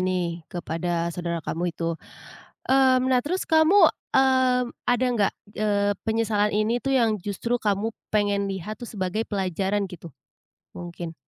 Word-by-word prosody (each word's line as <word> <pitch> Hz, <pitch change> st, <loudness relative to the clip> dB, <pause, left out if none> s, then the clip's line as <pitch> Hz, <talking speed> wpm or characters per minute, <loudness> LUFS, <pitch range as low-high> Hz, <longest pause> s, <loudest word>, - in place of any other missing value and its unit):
ini 180 Hz, -2 st, -1 dB
kepada 170 Hz, 0 st, -2 dB
saudara 170 Hz, -2 st, -4 dB
kamu 175 Hz, +2 st, -2 dB
itu, 170 Hz, 0 st, -1 dB, 0.8 s
mmm, 260 Hz, -1 st, +4 dB
nah 255 Hz, -, +4 dB
terus 365 Hz, +5 st, -2 dB
kamu, 325 Hz, +3 st, +6 dB, 0.2 s
eee, 260 Hz, -1 st, +4 dB, 0.2 s
ada 245 Hz, +1 st, +2 dB
nggak, 200 Hz, -2 st, +2 dB, 0.3 s
eee, 205 Hz, -1 st, +1 dB
penyesalan 220 Hz, -2 st, +1 dB
ini 215 Hz, +3 st, +1 dB
tuh 270 Hz, +2 st, -2 dB
yang 230 Hz, -5 st, +3 dB
justru 205 Hz, +5 st, -2 dB
kamu 210 Hz, -1 st, 0 dB, 0.2 s
pengen 205 Hz, -1 st, +1 dB
lihat 195 Hz, +2 st, -5 dB
tuh 240 Hz, -, -8 dB
sebagai 210 Hz, 0 st, -3 dB
pelajaran 195 Hz, 0 st, -1 dB
gitu, 170 Hz, -4 st, -11 dB, 0.6 s
mungkin? 175 Hz, -1 st, -7 dB
205 Hz, 140 wpm, -25 LUFS, 180-245 Hz, 0.8 s, kamu